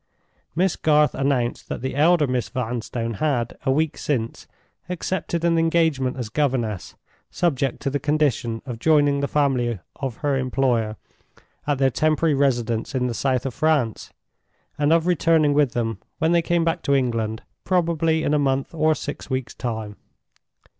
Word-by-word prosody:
Miss 185 +2 +2
Garth 150 -1 +3
announced 130 -3 -1
that - - -4
the 130 +1 -3
elder 155 +2 +4
Miss 125 -2 -1
Vanstone 115 -2 -3
had, 125 -6 0
a - - +4
week 155 +2 0
since, 115 -6 -2 0.4
accepted 175 -1 -2
an 165 -1 +3
engagement 160 -6 +1
as 125 -3 -3
governess, 120 -7 -1 0.3
subject 140 -7 0
to 140 - 0
the 145 - -1
condition 135 -6 0
of 120 -3 -6
joining 145 -1 +3
the 140 - 0
family 130 -6 +1 0.2
of 135 -4 -4
her 140 -2 +2
employer 125 -4 0 0.7
at 145 -2 +1
their 135 0 +3
temporary 155 +2 +2
residence 120 -3 0
in 125 -1 +1
the 125 - -1
south 130 +2 0
of 135 - -3
France, 145 -8 0 0.6
and 145 +1 +1
of 165 0 +4
returning 165 -3 +3
with 145 -3 +2
them 115 -2 -2 0.2
when 160 -1 +1
they 170 0 +4
came 170 0 +1
back 165 - 0
to 140 - +2
England, 115 -4 -1 0.2
probably 165 -3 +1
in 150 - +1
a 150 - +3
month 135 0 0
or 155 -1 +2
six 145 - -6
weeks' 130 -2 -3
time. 110 -4 -5
140 Hz, 160 wpm, -23 LUFS, 120-155 Hz, 0.7 s, elder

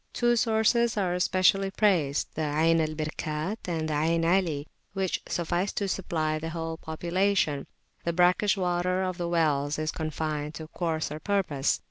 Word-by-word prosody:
Two 240 0 +2
sources 230 0 +2
are 185 -3 +1
especially 185 +2 +3
praised, 180 -9 +1
the 160 - -3
Ayn 160 +2 +2
al 155 0 -2
Birkat 155 +5 -3
and 160 -3 -1
the 155 - -2
Ayn 165 +2 +1
Ali, 165 -5 +1 0.3
which 190 -2 -1
suffice 175 +3 -1
to 200 - -1
supply 160 -5 -1
the 160 +1 -4
whole 165 0 -4
population: 170 -2 0 0.4
the 170 - 0
brackish 180 +4 +3
water 180 0 0
of 185 -1 -3
the 170 -1 -2
wells 150 -4 +1
is 155 0 -1
confined 155 -2 -3
to 155 +1 -7
coarser 160 -3 -2
purposes. 165 -7 0
170 Hz, 155 wpm, -27 LUFS, 155-190 Hz, 0.4 s, especially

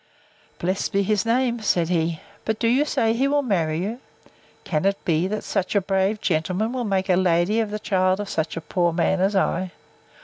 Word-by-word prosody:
Blessed 185 +2 -2
be 200 0 +2
his 210 +1 0
name! 240 0 +1
said 175 -5 +1
he. 165 -2 0 0.2
But 220 -1 -1
do 230 - 0
you 260 +6 +3
say 225 -6 +1
he 260 +4 +1
will 285 0 +1
marry 165 - 0
you? 225 +5 -4 0.6
Can 155 -1 -1
it 195 0 +2
be, 165 +1 +1
that 210 +2 -3
such 195 0 -2
a - - +6
brave 195 +2 0
gentleman 185 +7 -1
will 250 -2 -2
make 195 -2 0
a 185 - +4
lady 180 +3 +2
of 220 -2 0
the 210 - -3
child 185 -2 +1
of 205 - -4
such 160 -3 -2
a - - -3
poor 175 +1 0
man 180 +2 +1
as 195 +2 +1
I? 185 -1 0
195 Hz, 210 wpm, -23 LUFS, 175-220 Hz, 0.6 s, a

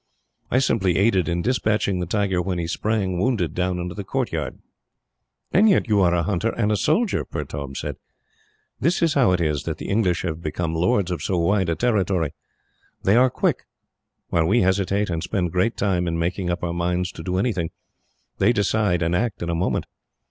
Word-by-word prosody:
I - - +2
simply 105 -8 +2
aided 95 -4 +2
in 85 0 -1
despatching 105 -6 +1
the 90 - -2
tiger 100 -2 0
when 90 0 -2
he 85 - -2
sprang, 95 +1 -1
wounded, 105 -6 0
down 90 0 -1
into 90 0 -4
the 100 - -6
courtyard." 90 - -2 0.9
"And 215 +4 +5
yet 190 - +3
you 105 -2 +3
are 90 -1 +3
a 85 - +1
hunter 100 +4 0
and 110 -2 +1
a - - +3
soldier," 170 - +1
Pertaub 70 -1 -6
said. - - -4 0.8
"This 170 +4 +1
is 165 -3 +3
how 125 -8 +4
it 90 - +2
is 75 -4 0
that - - -3
the - - -7
English 100 -5 +1
have 85 -2 -3
become 80 +1 -2
lords 90 +2 +1
of 90 - -3
so 95 - -1
wide 95 +1 +2
a 85 - +1
territory. 95 - 0 0.7
They 100 - +4
are 130 +2 +5
quick. - - -1 0.6
While 80 -1 +2
we 115 +7 +3
hesitate, 95 +1 +1
and 80 -1 -2
spend 90 -4 -1
great 95 +6 0
time 90 -3 0
in 85 -1 -1
making 90 +2 -1
up 85 0 -2
our 85 -1 -1
minds 90 +1 -1
to - - -9
do 90 +2 -2
anything, 95 -6 0 0.7
they 120 - +4
decide 100 -4 +1
and 85 +1 +1
act 110 -1 -1
in 85 - -2
a - - -1
moment. 85 +3 0
95 Hz, 200 wpm, -23 LUFS, 85-105 Hz, 0.9 s, And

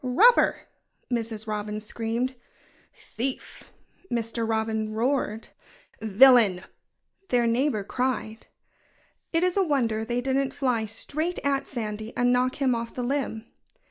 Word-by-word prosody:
"Robber!" 410 - +4 0.5
Mrs. 225 -2 -3
Robin 210 0 -3
screamed. 230 +4 -2 0.6
"Thief!" 255 +3 -5 0.4
Mr. 230 -1 -2
Robin 220 -1 -1
roared. 230 -2 -1 0.5
"Villain!" 220 -3 +6 0.7
their 245 -1 +3
neighbor 235 -2 +1
cried. 245 -1 -3 0.8
It 330 +1 +2
is 365 +1 +1
a 390 - +4
wonder 235 -9 0
they 240 +2 -1
didn't 265 +1 -1
fly 245 -5 0
straight 305 +11 -3
at 275 -1 0
Sandy 220 -3 -5
and 245 0 +3
knock 250 +1 +1
him 270 -3 +1
off 230 0 -4
the 250 - -3
limb. 245 -4 -2
240 Hz, 120 wpm, -26 LUFS, 220-265 Hz, 0.8 s, Villain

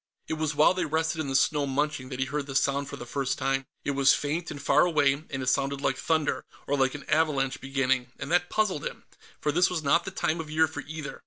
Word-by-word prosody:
It - - -2
was 155 -1 -1
while 150 +4 +5
they 185 - -1
rested 160 +1 0
in 150 - -4
the 135 - -2
snow, 145 +1 +2
munching, 140 -1 -1
that 130 -1 -6
he 135 - +1
heard 145 +1 -3
the 135 - -6
sound 140 +1 +1
for - - -6
the - - -8
first 135 +2 -2
time. 135 -1 -1 0.2
It - - +1
was 140 -1 +4
faint 160 +4 -2
and 145 - -6
far 140 - +3
away, 150 -5 +3 0.2
and 135 -2 -3
it - - -5
sounded 140 +1 +1
like - - 0
thunder, 160 -2 0 0.2
or 145 - 0
like 135 0 +1
an 145 - -9
avalanche 150 -4 +1
beginning, 135 -2 0
and 145 - -6
that 175 0 +2
puzzled 205 -8 0
him, - - -6 0.4
for 150 - 0
this 175 +4 +3
was 170 -3 -2
not 160 +4 +3
the - - -3
time 170 -3 -1
of 160 -2 -5
year 160 +1 +3
for 145 -2 -6
either. 150 -2 -6
145 Hz, 255 wpm, -27 LUFS, 135-160 Hz, 0.4 s, while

